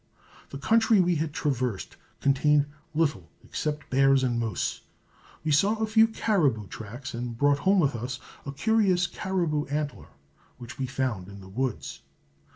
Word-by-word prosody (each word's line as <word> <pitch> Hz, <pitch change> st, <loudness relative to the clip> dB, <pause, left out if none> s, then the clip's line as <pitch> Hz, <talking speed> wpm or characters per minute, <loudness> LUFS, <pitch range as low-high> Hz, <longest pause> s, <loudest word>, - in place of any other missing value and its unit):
The 140 Hz, -, -7 dB
country 225 Hz, +6 st, +4 dB
we 175 Hz, -2 st, +3 dB
had 155 Hz, 0 st, -2 dB
traversed 130 Hz, -8 st, -2 dB, 0.3 s
contained 145 Hz, +1 st, +3 dB, 0.3 s
little 145 Hz, -, 0 dB
except 150 Hz, -1 st, -3 dB
bears 135 Hz, 0 st, +4 dB
and 120 Hz, -2 st, +1 dB
moose. 110 Hz, -5 st, -2 dB, 0.6 s
We 155 Hz, -, 0 dB
saw 195 Hz, +10 st, +4 dB
a 220 Hz, 0 st, 0 dB
few 220 Hz, +1 st, +5 dB
caribou 165 Hz, -, +1 dB
tracks, 120 Hz, +7 st, -8 dB
and 120 Hz, 0 st, -5 dB
brought 145 Hz, +2 st, +3 dB
home 190 Hz, +6 st, +3 dB
with 140 Hz, -5 st, +1 dB
us 125 Hz, +2 st, -4 dB, 0.2 s
a 140 Hz, -, -5 dB
curious 190 Hz, +2 st, +2 dB
caribou 170 Hz, -6 st, -1 dB
antler, 145 Hz, -6 st, -3 dB, 0.5 s
which 120 Hz, 0 st, -10 dB
we 130 Hz, -, -1 dB
found 125 Hz, -8 st, -2 dB
in 100 Hz, 0 st, -10 dB
the 95 Hz, -1 st, -12 dB
woods. 125 Hz, +3 st, -3 dB
140 Hz, 155 wpm, -27 LUFS, 120-175 Hz, 0.6 s, few